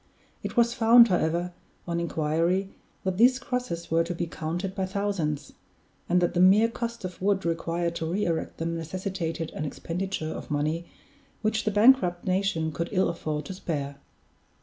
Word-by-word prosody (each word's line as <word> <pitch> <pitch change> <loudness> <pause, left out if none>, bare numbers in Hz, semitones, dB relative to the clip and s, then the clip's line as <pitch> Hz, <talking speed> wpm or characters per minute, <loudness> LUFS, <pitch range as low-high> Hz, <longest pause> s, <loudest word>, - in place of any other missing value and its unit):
It - - -6
was 235 0 +4
found, 235 0 +7
however, 175 0 0 0.3
on 170 0 -1
inquiry, 170 +3 0 0.3
that 190 -1 -1
these 250 +2 +6
crosses 250 -12 -4
were 165 +1 +4
to 175 +1 -4
be 170 - -2
counted 170 +4 -4
by 190 -1 -2
thousands, 190 -7 -2 0.6
and 180 +1 +4
that 175 - +1
the - - 0
mere 200 +5 +6
cost 235 -2 -5
of 180 -1 -7
wood 195 -1 +1
required 170 +1 -1
to 160 - -3
re 200 +4 0
erect 165 -2 -2
them 165 +1 -2
necessitated 165 -1 -4
an - - -5
expenditure 165 +2 -3
of - - -7
money 155 +3 -1 0.6
which 220 +1 0
the 215 - +2
bankrupt 210 -5 +4
nation 185 -4 0
could 170 +3 -3
ill 190 -1 +2
afford 155 -3 -3
to 190 - -6
spare. 145 -6 -4
175 Hz, 170 wpm, -27 LUFS, 165-200 Hz, 0.6 s, found